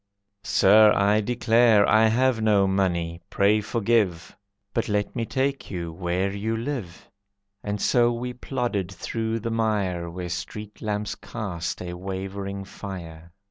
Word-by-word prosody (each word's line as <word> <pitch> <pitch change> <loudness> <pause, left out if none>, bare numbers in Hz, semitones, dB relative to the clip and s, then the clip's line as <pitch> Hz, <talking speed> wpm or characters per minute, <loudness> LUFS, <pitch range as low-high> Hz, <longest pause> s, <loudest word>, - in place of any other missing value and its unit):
"Sir, 105 +1 +6
I 105 +2 +3
declare 115 -1 +4
I 110 +1 +5
have 120 +1 +2
no 105 -3 +4
money, 85 -3 0
pray 105 +2 +3
forgive, 105 -5 0 0.4
But 115 - -1
let 105 0 -1
me 115 -2 -2
take 135 +3 -1
you 85 -3 -4
where 90 +2 -1
you 110 +3 -2
live." 115 -8 -5 0.6
And 105 0 -3
so 120 +2 +3
we 125 +1 -4
plodded 120 -7 -2
through 110 +4 -3
the 115 +1 -3
mire 100 -6 0
Where 90 +1 -6
street 105 +4 -6
lamps 105 -1 -2
cast 90 -7 -5
a 90 -1 -5
wavering 95 +2 -5
fire. 85 -4 -9
105 Hz, 140 wpm, -25 LUFS, 95-115 Hz, 0.6 s, Sir